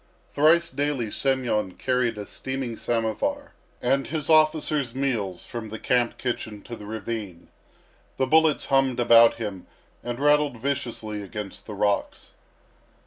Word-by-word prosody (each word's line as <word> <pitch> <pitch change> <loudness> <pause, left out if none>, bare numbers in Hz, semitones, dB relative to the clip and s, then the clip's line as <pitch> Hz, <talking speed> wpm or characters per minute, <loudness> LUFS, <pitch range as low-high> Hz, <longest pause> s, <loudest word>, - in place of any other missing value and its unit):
Thrice 165 +3 +4
daily 135 -5 -1
Semyon 125 -8 0
carried 125 -2 0
a 105 - -5
steaming 130 +1 -4
samovar 115 -2 -2 0.3
and 135 +2 +1
his 155 -1 -2
officer's 155 -4 +3
meals 115 -10 -2
from 115 -2 -6
the 110 - -6
camp 120 +1 +1
kitchen 110 -4 -4
to 120 - -7
the 105 -2 -10
ravine. 110 -5 -6 0.7
The 130 - +2
bullets 160 +2 +3
hummed 135 -2 +2
about 115 -1 +7
him 105 -5 -6 0.4
and 120 +1 -4
rattled 145 -2 +3
viciously 115 -5 -3
against 100 0 -7
the 105 - -6
rocks. 100 0 -1
120 Hz, 135 wpm, -25 LUFS, 110-140 Hz, 0.7 s, about